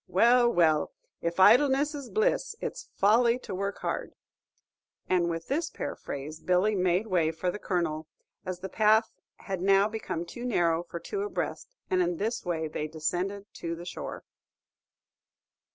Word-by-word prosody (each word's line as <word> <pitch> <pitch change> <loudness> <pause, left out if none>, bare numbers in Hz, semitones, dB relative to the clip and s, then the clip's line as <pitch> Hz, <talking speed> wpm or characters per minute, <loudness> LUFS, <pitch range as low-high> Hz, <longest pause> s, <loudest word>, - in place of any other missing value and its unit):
Well, 240 +5 +5
well! 160 -5 +3 0.3
'if 170 +2 -2
idleness 275 +8 +5
is 280 -4 -7
bliss, 450 +1 +1
it's - - -5
folly 230 +4 +4
to 250 - -8
work 200 +2 -2
hard.'" - - -3 0.9
And 175 -2 +2
with 165 0 -4
this 315 +4 -1
paraphrase, 150 +3 -6
Billy 185 +5 +2
made 185 +1 +2
way 175 -6 +2
for 165 +3 -2
the 205 - -7
Colonel, 160 -5 -2 0.4
as 185 -1 -5
the 190 - -4
path 220 +2 +3 0.2
had 190 -3 -5
now 195 +1 +4
become 215 -6 -4
too 240 +8 -8
narrow 170 -9 +2
for 170 0 -7
two 400 - -4
abreast, 415 +4 -4
and 185 0 +2
in 175 -1 0
this 225 +5 -2
way 165 -3 -2
they 155 0 -3
descended 180 +6 -2
to 170 0 -4
the 170 +1 -9
shore. 175 - -6
185 Hz, 155 wpm, -28 LUFS, 170-225 Hz, 0.9 s, Well